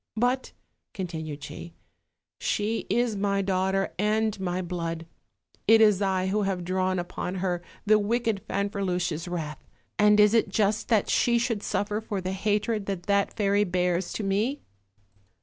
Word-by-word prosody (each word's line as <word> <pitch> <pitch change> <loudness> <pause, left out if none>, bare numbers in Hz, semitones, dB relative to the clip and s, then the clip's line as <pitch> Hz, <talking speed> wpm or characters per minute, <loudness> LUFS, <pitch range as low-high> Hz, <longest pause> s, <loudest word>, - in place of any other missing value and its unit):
But," 250 +3 +1 0.4
continued 160 -6 -5
she, 170 +3 -8 0.6
"she 215 +2 -1
is 240 -2 +1
my 200 0 0
daughter 190 0 0
and 215 0 +1
my 180 -1 -2
blood: 165 -2 -4 0.6
it 225 +1 +7
is 210 -3 +5
I 190 -2 +1
who 200 +3 +1
have 195 -3 -1
drawn 185 +1 0
upon 180 +1 -4
her 180 -2 -1 0.2
the 215 0 +5
wicked 225 -1 0
Fanferluche'"s 180 -4 -1
wrath, 160 -4 -5 0.4
and 210 0 +6
is 210 +1 +6
it 225 -3 +3
just 210 +1 +1
that 220 -4 +2
she 235 -1 +3
should 230 -3 0
suffer 210 +1 -1
for 210 -3 -3
the 185 0 -3
hatred 210 +2 0
that 195 -3 -3
that 200 +1 +1
fairy 205 -1 +3
bears 180 -1 0
to 215 - -3
me?" 210 +8 0
200 Hz, 150 wpm, -27 LUFS, 180-210 Hz, 0.6 s, it